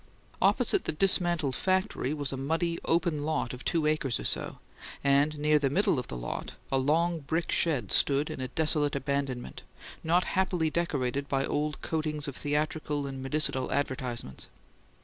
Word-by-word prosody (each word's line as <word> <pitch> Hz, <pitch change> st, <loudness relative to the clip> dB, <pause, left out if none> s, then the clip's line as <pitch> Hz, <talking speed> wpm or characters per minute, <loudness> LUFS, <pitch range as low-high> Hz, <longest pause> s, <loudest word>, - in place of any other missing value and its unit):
Opposite 400 Hz, -, +3 dB
the -, -, 0 dB
dismantled 175 Hz, -5 st, +3 dB
factory 185 Hz, -7 st, 0 dB
was 145 Hz, -2 st, -1 dB
a -, -, -3 dB
muddy, 165 Hz, +5 st, -1 dB
open 165 Hz, -3 st, +1 dB
lot 150 Hz, -5 st, -1 dB
of 125 Hz, -, -8 dB
two 165 Hz, -3 st, +1 dB
acres 150 Hz, -5 st, +1 dB
or -, -, -5 dB
so, -, -, -2 dB, 0.5 s
and 140 Hz, +2 st, +3 dB
near 150 Hz, +1 st, +3 dB
the 140 Hz, -2 st, +1 dB
middle 155 Hz, -2 st, +2 dB
of 125 Hz, -, -6 dB
the 60 Hz, -, -5 dB
lot, -, -, -5 dB, 0.2 s
a 135 Hz, -, +3 dB
long 165 Hz, +5 st, +1 dB
brick 160 Hz, +4 st, -2 dB
shed 135 Hz, -, +2 dB
stood 140 Hz, +1 st, +3 dB
in -, -, -6 dB
a 130 Hz, -, -2 dB
desolate 150 Hz, -1 st, +1 dB
abandonment, 140 Hz, -2 st, -3 dB, 0.4 s
not 175 Hz, +3 st, +3 dB
happily 180 Hz, -5 st, 0 dB
decorated 140 Hz, -5 st, -1 dB
by 135 Hz, 0 st, +1 dB
old 150 Hz, +1 st, -2 dB
coatings 155 Hz, -2 st, -2 dB
of 140 Hz, -, -5 dB
theatrical 150 Hz, 0 st, -1 dB
and 135 Hz, -1 st, -6 dB
medicinal 135 Hz, -1 st, 0 dB
advertisements. 125 Hz, -, -3 dB
150 Hz, 165 wpm, -29 LUFS, 135-160 Hz, 0.5 s, Opposite